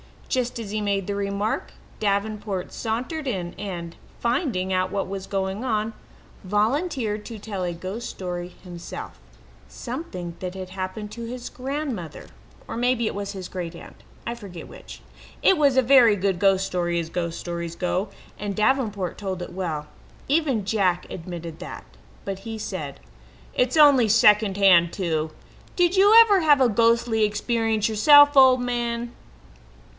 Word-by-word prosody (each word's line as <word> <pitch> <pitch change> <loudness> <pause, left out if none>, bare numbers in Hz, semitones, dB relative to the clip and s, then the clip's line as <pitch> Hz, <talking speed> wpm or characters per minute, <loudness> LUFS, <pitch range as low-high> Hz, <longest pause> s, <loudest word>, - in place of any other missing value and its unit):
Just 250 -2 -1
as 215 -3 -6
he 215 0 -2
made 200 -2 0
the 205 - -3
remark, 200 +1 -2 0.3
Davenport 205 -2 -2
sauntered 255 +7 -3
in 180 -7 -3
and, 175 -4 -6 0.2
finding 235 - -1
out 185 0 +1
what 195 0 -2
was 195 0 -6
going 195 +2 -2
on, 220 -3 -1 0.5
volunteered 215 - 0
to 230 - -7
tell 200 -3 -5
a 175 -1 -2
ghost 190 +7 -6
story 180 -1 -6
himself 175 -2 -8 0.5
something 180 - -6
that 180 0 -5
had 185 -1 -7
happened 190 +3 -5
to 230 +1 -7
his 245 +1 -6
grandmother, 260 - -5 0.4
or - - -5
maybe 245 -1 +1
it - - -1
was 200 0 -5
his 190 -2 -6
great 175 -2 -5
aunt; - - -13 0.2
I 235 - -2
forget 200 -7 -10
which. - - -12 0.4
It 385 - +5
was 285 -3 +3
a - - +7
very 245 -4 +6
good 190 -2 -1
ghost 195 -1 +3
story 175 -2 -1
as 165 -1 -2
ghost 170 -1 -3
stories 170 -1 -5
go, 185 +3 -1 0.3
and 205 -1 -3
Davenport 215 -6 0
told 190 -3 -4
it - - -6
well. 160 -5 -3 0.4
Even 275 -9 +1
Jack 190 -4 +1
admitted 170 -2 -7
that, - - -8 0.4
but 195 -1 -4
he 225 +2 -6
said: 215 - -6 0.5
"It's 250 +4 +1
only 285 -6 +7
second 210 -2 +5
hand 175 -4 +5
too. 160 -4 -1 0.4
Did 355 +1 +2
you 405 +3 +6
ever 415 -4 +5
have 295 -5 +4
a 255 - +5
ghostly 230 0 +2
experience 220 +1 0
yourself, 290 +6 +7
old 260 -1 +7
man?" 240 -1 -2
205 Hz, 155 wpm, -24 LUFS, 185-240 Hz, 0.5 s, a